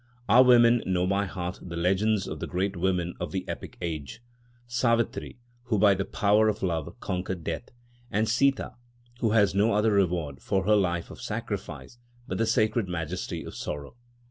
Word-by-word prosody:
Our 120 +5 +7
women 120 -2 +6
know 90 -1 +1
by 100 +2 +1
heart 90 -1 -5
the 85 -1 -7
legends 95 +4 +1
of - - -5
the - - -4
great 95 +2 -1
women 90 -1 0
of - - -4
the 95 -1 -4
epic - - -7
age—Savitri 120 - -3 0.3
who 115 -4 0
by 100 0 +6
the 95 0 -2
power 105 +1 +3
of 105 -1 -3
love 85 +3 -2
conquered 90 -3 -3
death, 80 +8 -4 0.4
and 110 +1 +1
Sitâ 130 +4 +1 0.5
who 115 - +1
had 100 -3 +4
no 105 +4 +3
other 105 +2 +3
reward 85 -8 0
for 95 -1 0
her 105 +1 +5
life 85 -4 0
of - - -11
sacrifice 120 - -5 0.3
but 95 - -3
the 115 - +2
sacred 110 -2 +2
majesty 90 0 -4
of - - -8
sorrow. 75 +4 -6
100 Hz, 170 wpm, -27 LUFS, 90-115 Hz, 0.5 s, Our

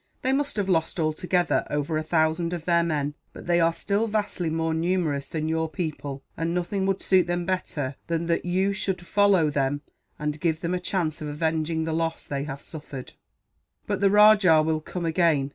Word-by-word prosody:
"They 260 - +2
must 285 +1 -1
have 205 -3 -1
lost, 165 -1 0
altogether, 175 +3 +1
over 150 +2 -1
a 155 - +1
thousand 160 +2 +1
of 170 -2 -5
their 170 -1 +4
men; 150 -3 -1 0.2
but - - -10
they 175 0 +3
are 165 0 +4
still 200 +6 -1
vastly 205 -5 -1
more 160 0 0
numerous 160 -4 0
than 155 -1 -2
your 160 0 0
people, 145 -5 -4
and 165 +1 -2
nothing 190 +2 -1
would 195 -1 -1
suit 185 -2 +4
them 175 0 -1
better 150 -7 -2
than 170 0 -1
that 170 0 0
you 190 +3 +1
should 190 -3 -2
follow 195 -6 +3
them, 140 0 0 0.4
and 150 0 -3
give 165 -1 0
them 170 0 -1
a 180 - 0
chance 175 -4 -2
of 150 - -4
avenging 160 +1 -1
the 160 0 -2
loss 165 0 -2
they 140 0 -3
have 140 -1 -7
suffered." 145 -5 -9 0.7
"But - - -2
the 200 - +5
rajah 205 -6 +6
will 155 0 0
come 175 +2 -5
again. 160 -5 +2
165 Hz, 195 wpm, -25 LUFS, 155-180 Hz, 0.7 s, rajah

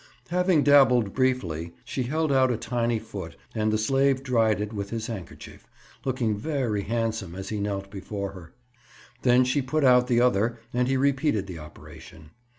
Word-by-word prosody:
Having 180 -3 +2
dabbled 130 -7 +5
briefly, 90 - -1
she 130 - -3
held 155 +5 0
out 130 -1 +4
a 120 - 0
tiny 120 0 -1
foot 95 -7 -8 0.2
and 110 -1 0
the 110 - +2
slave 135 +4 +2
dried 115 -5 +2
it 105 +1 -4
with 100 -1 -4
his 115 0 -4
handkerchief, 110 -7 -9 0.4
looking 125 -5 0
very 115 -3 -1
handsome 110 -4 -2
as 95 0 -6
he 105 - -3
knelt 100 -1 -3
before 100 0 -5
her. 90 -4 -12 0.7
Then 125 0 +5
she 130 +3 +1
put 140 +4 -1
out 125 -1 +5
the 120 -2 +3
other 120 -1 +2
and 125 0 +1
he 135 0 +1
repeated 135 -5 +1
the 90 -4 -8
operation. 75 0 -13
115 Hz, 170 wpm, -26 LUFS, 100-130 Hz, 0.7 s, dabbled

